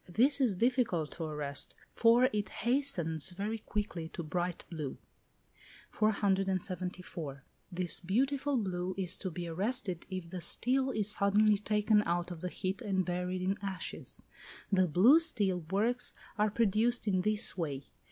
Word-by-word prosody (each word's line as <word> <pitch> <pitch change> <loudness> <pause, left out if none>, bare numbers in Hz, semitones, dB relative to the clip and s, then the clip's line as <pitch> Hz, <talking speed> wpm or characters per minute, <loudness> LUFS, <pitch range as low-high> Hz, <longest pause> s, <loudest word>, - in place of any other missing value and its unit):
This 265 +10 +4
is 235 -7 +2
difficult 230 - +1
to 165 - -5
arrest, 150 -2 -2 0.2
for 235 +2 +5
it 210 -1 -1
hastens 190 - +2
very 205 +5 -4
quickly 205 -7 -4
to 170 - -6
bright 175 +2 -3
blue. 155 -5 -5 0.9
474. 185 -7 -1 0.3
This 180 -1 +2
beautiful 270 +9 0
blue 185 -4 -2
is 185 -3 +1
to 190 - -3
be 175 0 -5
arrested 190 +1 -2
if 185 -3 -6
the 185 -2 -5
steel 260 +9 +1
is 210 -4 +3
suddenly 210 0 +3
taken 210 0 +2
out 175 +1 -1
of 170 -2 -7
the 180 - -1
heat 185 +5 -3
and 190 -5 0
buried 180 +1 -2
in 195 +2 -1
ashes. 195 -2 -4 0.5
The 185 -2 +3
blue 210 - +6
steel 205 - 0
works 225 +6 0 0.2
are 210 0 +2
produced 225 +2 +1
in 185 -2 +2
this 215 +3 +2
way. 145 -6 -3
190 Hz, 145 wpm, -32 LUFS, 175-220 Hz, 0.9 s, blue